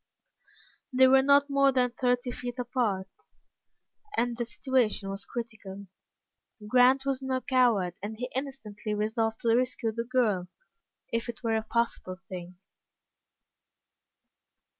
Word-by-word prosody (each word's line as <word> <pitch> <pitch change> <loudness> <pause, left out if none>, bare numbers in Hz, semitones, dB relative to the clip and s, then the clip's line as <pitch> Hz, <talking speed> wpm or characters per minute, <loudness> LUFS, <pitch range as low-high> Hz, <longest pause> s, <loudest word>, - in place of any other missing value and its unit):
They 260 0 +6
were 265 +1 +6
not 280 +1 +5
more 275 -1 +4
than 250 -2 +1
thirty 245 0 0
feet 245 0 -6
apart, 240 -6 -1 1.1
and 240 0 +1
the 240 0 -3
situation 230 -4 0
was 195 +1 -6
critical. 205 -4 -7 0.8
Grant 255 +4 +5
was 275 -1 -1
no 260 -1 -1
coward, 235 -10 +2
and 215 +2 -5
he 250 +2 -4
instantly 230 -6 -4
resolved 220 +1 -1
to 230 -1 +3
rescue 250 -2 0
the 230 +1 -3
girl 225 -8 +1 0.7
if 230 +1 -1
it 240 +1 -7
were 225 -1 +1
a 220 - +1
possible 230 -5 -2
thing. 180 -1 -9
240 Hz, 125 wpm, -28 LUFS, 215-255 Hz, 1.1 s, They